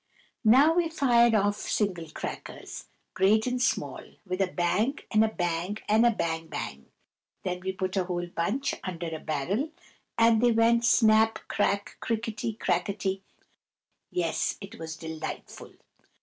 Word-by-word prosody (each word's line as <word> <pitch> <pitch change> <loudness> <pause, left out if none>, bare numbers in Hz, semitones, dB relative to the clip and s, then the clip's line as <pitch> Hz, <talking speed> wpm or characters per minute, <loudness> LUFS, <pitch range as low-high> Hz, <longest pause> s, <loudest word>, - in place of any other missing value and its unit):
Now 265 +8 +6
we 340 -1 +1
fired 240 -7 +4
off 205 0 +2
single 180 -8 -1
crackers, - - -7 0.3
great 210 +3 +3
and 250 0 -1
small, - - 0 0.2
with 185 0 -2
a 190 - +3
bang 185 - 0
and 215 0 +5
a - - +3
bang 175 -1 -2
and 220 +3 +5
a - - +6
bang 165 -7 -2
bang; 70 - -6 0.6
then 180 -1 -2
we 190 +1 -3
put 185 0 -3
a 190 -2 +1
whole 175 -1 -2
bunch 200 +11 -1
under 170 -3 -4
a - - -6
barrel, 175 - -1 0.5
and 230 -1 +5
they 240 -1 +4
went 230 +1 +3
snap, 220 -1 +5
crack, 200 -1 -1
crickety, 225 0 -2
crackety. 190 -1 -1 0.9
Yes, 170 -2 -1
it 195 -1 -10
was 160 -1 -6
delightful. 160 -2 -7
200 Hz, 145 wpm, -28 LUFS, 175-230 Hz, 0.9 s, Now